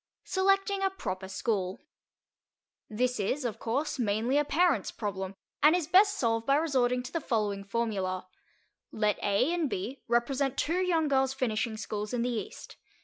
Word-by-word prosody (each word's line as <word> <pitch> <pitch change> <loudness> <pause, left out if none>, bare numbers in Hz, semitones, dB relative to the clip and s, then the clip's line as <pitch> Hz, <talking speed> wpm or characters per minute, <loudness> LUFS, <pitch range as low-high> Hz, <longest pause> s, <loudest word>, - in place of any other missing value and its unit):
SELECTING 390 +1 +1
A 385 - +2
PROPER 190 - -5
SCHOOL 190 -1 -2 1.1
This 250 +3 0
is, 255 +7 -1
of 230 - -3
course, 275 +5 -2
mainly 225 +3 +1
a - - +3
parent's 340 +4 +2
problem 195 -2 -4 0.3
and 300 +4 +6
is 355 -3 0
best 400 +5 +5
solved 225 -2 0
by 275 - +5
resorting 255 -5 +1
to 255 - -8
the 330 - -1
following 210 -6 -1
formula: 195 -4 -2 0.7
Let 210 -1 0
A 205 +11 +2
and 335 -5 0
B 240 +8 -4
represent 260 +3 +1
two 345 +4 +1
young 335 -4 +2
girls' 270 -1 +2
finishing 225 -3 -1
schools 210 +2 -4
in 235 - 0
the 250 - 0
East. 230 - -6
245 Hz, 160 wpm, -29 LUFS, 210-300 Hz, 1.1 s, and